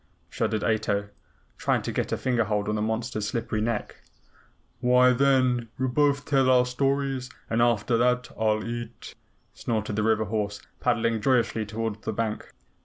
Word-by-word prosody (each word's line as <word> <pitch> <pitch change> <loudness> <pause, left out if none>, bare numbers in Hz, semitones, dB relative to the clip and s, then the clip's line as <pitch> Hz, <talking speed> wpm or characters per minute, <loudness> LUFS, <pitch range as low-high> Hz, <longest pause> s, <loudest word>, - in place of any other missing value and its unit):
shuddered 110 -1 -1
Ato, 100 -2 0 0.5
trying - - +1
to - - -3
get - - -2
a - - 0
finger 120 -3 +1
hold 105 0 -1
on 105 - 0
the 105 - -1
monster's 110 0 -2
slippery 110 -1 -2
neck. 115 -1 -2 0.8
"Why, 125 +1 +5
then, 130 -3 +2
we'll 130 0 0
both 140 +2 +2
tell 135 -2 +3
our 125 -1 +5
stories, 135 0 -1 0.2
and 115 +1 +2
after 120 0 +2
that 125 +1 +1
I'll 110 -1 0
eat," 120 0 -6 0.4
snorted 110 -3 -2
the 110 - 0
river 110 0 +2
horse, 105 0 -2 0.2
paddling 115 -2 +1
joyously 115 -3 +1
toward 110 0 -4
the 110 - -3
bank. 110 0 -3
115 Hz, 160 wpm, -26 LUFS, 110-125 Hz, 0.8 s, Why